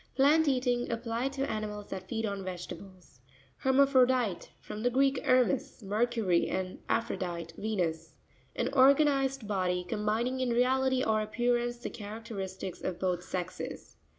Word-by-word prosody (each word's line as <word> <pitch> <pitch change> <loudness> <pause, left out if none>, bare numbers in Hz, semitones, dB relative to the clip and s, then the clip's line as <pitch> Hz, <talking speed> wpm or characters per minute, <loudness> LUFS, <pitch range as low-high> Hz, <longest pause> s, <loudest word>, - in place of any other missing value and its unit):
Plant 295 +4 +5
eating; 250 -3 +1
applied 235 +3 -2
to 275 0 -1
animals 210 -1 -4
that 185 -1 -5
feed 225 -1 -1
on 200 -2 -3
vegetables. 185 -3 -9 0.4
Herma'Puropite.—From 260 -6 +2
the 245 - +2
Greek, 270 +2 +2
ermes, 255 -1 +2
Mercury, 210 -3 +1
and 185 -1 -3
aphrodite, 175 -7 -2
Venus. 165 -7 -2 0.4
An 245 - 0
organized 275 -2 +4
body, 180 -3 0
com 190 - -3
bining 230 +5 0
in 255 - +1
reality 260 +2 +2
or 215 -1 +2
appearance 240 +2 0
the 240 - -6
characteristics 205 -3 -6
of 180 -2 -3
both 180 -2 0
sexes. 180 0 -6
225 Hz, 130 wpm, -30 LUFS, 190-255 Hz, 0.4 s, Plant